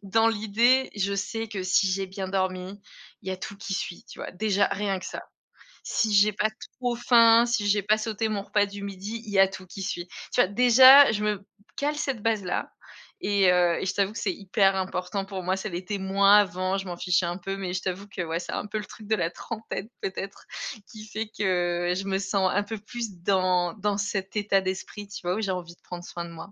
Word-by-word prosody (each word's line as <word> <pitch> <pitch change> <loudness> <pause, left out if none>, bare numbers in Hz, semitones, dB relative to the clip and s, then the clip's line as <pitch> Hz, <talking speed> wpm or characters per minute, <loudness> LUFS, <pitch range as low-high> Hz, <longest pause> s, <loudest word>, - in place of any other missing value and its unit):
dans 225 +3 +3
l'idée, 230 +5 +2
je 200 0 0
sais 225 +3 -3
que 195 -3 -4
si 185 +1 +3
j'ai 190 +1 -1
bien 190 0 -5
dormi, 190 +1 -2 0.4
il 190 - -7
y - - -1
a - - -4
tout 200 +2 -7
qui 195 -1 -5
suit, 175 - -4
tu - - -12
vois? - - -6
Déjà 205 +1 +2
rien 195 -1 -1
que - - -8
ça. - - -6 0.6
Si 220 -2 0
j'ai 205 +1 +5
pas 210 +2 0 0.3
trop 245 -1 0
faim, 235 -1 +6
si 235 -4 0
j'ai 205 0 +3
pas 210 +2 +2
sauté 220 0 -2
mon 200 -2 -2
repas 205 0 +2
du 200 0 -8
midi, 200 +3 -6
il 210 - -8
y 195 - +2
a 195 - +7
tout 190 0 -9
qui 195 +2 -9
suit, 180 -2 -4 0.3
tu - - +5
vois? - - +3
Déjà, 255 +6 +8
je 210 -1 -2
me 210 0 +1
b - - -20 0.3
cale 295 +1 -1
cette 270 -7 -2
base-là 210 -5 -1 0.5
et 200 -2 +4
heu, 175 -1 +3
et - - -3
je 190 - -1
t'avoue 200 +1 0
que - - -7
c'est 195 -4 -1
hyper 195 +1 +2
important 190 +1 -2
pour 195 -2 -6
moi. 185 +1 +1
Ça 195 +3 -4
l'était 185 +3 -4
moins 200 +2 +5
avant, 185 -1 +1
je 195 - -4
m'en 175 - -5
fichais 180 0 +1
un 175 +1 -3
peu 195 +1 -4
mais 185 -2 -4
je 185 - -2
t'avoue 190 +2 -4
que 195 -2 -5
ouais, 165 0 -2
c'est - - -6
un - - -3
peu 215 +1 -3
le 210 - -6
truc 215 - -12
de 220 - +2
la 165 - 0
trentaine 220 0 -6
peut-être 195 +1 -5 0.5
qui 215 -2 -10
fait 215 +1 -4
que 175 -4 0
je 195 - -3
me 195 -1 0
sens 195 -1 +1
un 205 +1 +2
peu 220 +1 -5
plus 215 -3 -6
dans 185 -2 +2
dans 205 -1 -1
cet 200 -1 -3
état 205 -2 +2
d'esprit, 190 +2 -5
tu 205 - -8
vois? 180 +1 0
Où 220 - -2
j'ai 195 -3 -1
envie 175 -2 -5
de - - -38
prendre 175 -1 -8
soin 175 -1 -6
de 170 - -10
moi. 165 +4 -10
195 Hz, 240 wpm, -26 LUFS, 185-215 Hz, 0.6 s, Déjà